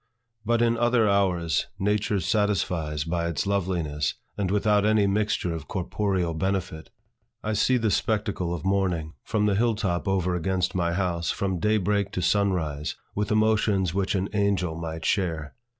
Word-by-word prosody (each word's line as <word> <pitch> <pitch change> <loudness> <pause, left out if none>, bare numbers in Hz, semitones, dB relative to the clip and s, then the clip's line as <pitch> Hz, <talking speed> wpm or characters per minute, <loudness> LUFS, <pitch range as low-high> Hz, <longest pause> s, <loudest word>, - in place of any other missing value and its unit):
But 115 +2 +2
in 115 0 +2
other 120 -2 +3
hours, 90 -6 +1
Nature 105 +1 +1
satisfies 90 -6 0
by 85 +1 -1
its 85 -4 -2
loveliness, 85 -7 -1 0.2
and 100 -3 -1
without 105 +1 +2
any 105 -1 +3
mixture 100 -3 0
of 80 -2 -6
corporeal 95 -2 -1
benefit. 90 -1 -2 0.5
I 110 - -1
see 125 +5 +3
the 115 -3 +1
spectacle 105 -6 0
of 85 -2 -4
morning 90 -5 0
from 105 -1 0
the 105 - +2
hill 115 +3 +2
top 95 -3 -2
over 95 -2 +1
against 90 +1 0
my 85 -2 0
house, 85 -2 -1
from 95 -3 -1
day 105 +4 +2
break 100 0 0
to 90 - -1
sun 100 +2 +3
rise, 75 -4 -3 0.2
with 105 0 -2
emotions 110 -4 +2
which 100 +1 0
an 95 0 0
angel 100 -5 +1
might 80 0 -5
share. 80 -6 -1
95 Hz, 165 wpm, -26 LUFS, 85-105 Hz, 0.5 s, other